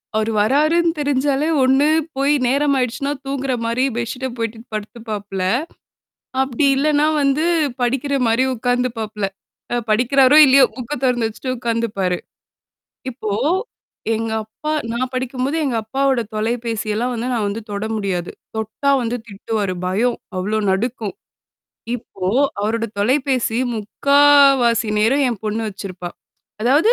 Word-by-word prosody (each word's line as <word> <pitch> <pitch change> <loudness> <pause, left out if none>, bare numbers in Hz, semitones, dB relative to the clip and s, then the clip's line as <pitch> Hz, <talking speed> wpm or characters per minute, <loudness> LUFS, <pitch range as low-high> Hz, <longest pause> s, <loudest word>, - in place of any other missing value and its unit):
அவரு 220 +1 +1
வர்றாருன்னு 310 +8 +3
தெரிஞ்சாலே 285 +1 +1 0.2
ஒண்ணு 265 +3 +4 0.3
போய் 280 +2 +3
நேரம் 280 +2 +2
ஆயிடுச்சுன்னா 260 +3 -1
தூங்குற 270 -1 -2
மாரி 235 +3 0
பெட்ஷிட்ட 250 +2 -3
போயிடு 230 -1 -3
படுத்துப்பாப்ல. 210 -3 -5 1.0
அப்படி 265 +2 0
இல்லன்னா 295 +1 +2 0.2
வந்து 280 +3 +2 0.4
படிக்கிற 270 +3 0
மாரி 230 +3 +3
உட்கார்ந்துபாப்ல. 235 -3 -2 0.5
அ - - +1
படிக்கிறாரோ, 255 +5 +4
இல்லையோ 270 0 +7
புக்க 250 +2 -7
தொறந்து 240 -3 +2
வச்சுட்டு 255 +4 -4
உட்காந்துப்பாரு. 225 -6 -1 0.9
இப்போ, 235 -4 -5 0.8
எங்க 225 0 -2
அப்பா 220 +8 -6 0.2
நான் 255 +2 -2
படிக்கும்போது 260 +3 -2
எங்க 255 -5 0
அப்பாவோட 265 +2 +1 0.2
தொலைபேசியெல்லாம் 225 +1 -1
வந்து 235 +1 -3
நான் 220 -3 0
வந்து 205 +3 -4
தொட 200 +1 -3
முடியாது. 190 -4 -2 0.3
தொட்டா 220 +6 -1
வந்து 235 +1 -1
திட்டுவாரு. 205 -1 -3
பயம். 225 +7 +1 0.2
அவ்ளோ 210 +4 -1
நடுக்கும். 215 +1 -2 0.8
இப்போ 195 -5 -7 0.3
அவரோட 225 +2 0
தொலைபேசி 255 +1 +1 0.2
முக்காவாசி 275 0 +4
நேரும் 245 +7 +3
என் 225 -5 -5
பொண்ணு 215 +1 -1
வச்சிருப்பா. 185 -3 -7 0.5
அதாவது. 290 - +4
240 Hz, 120 wpm, -20 LUFS, 215-270 Hz, 1.0 s, இல்லையோ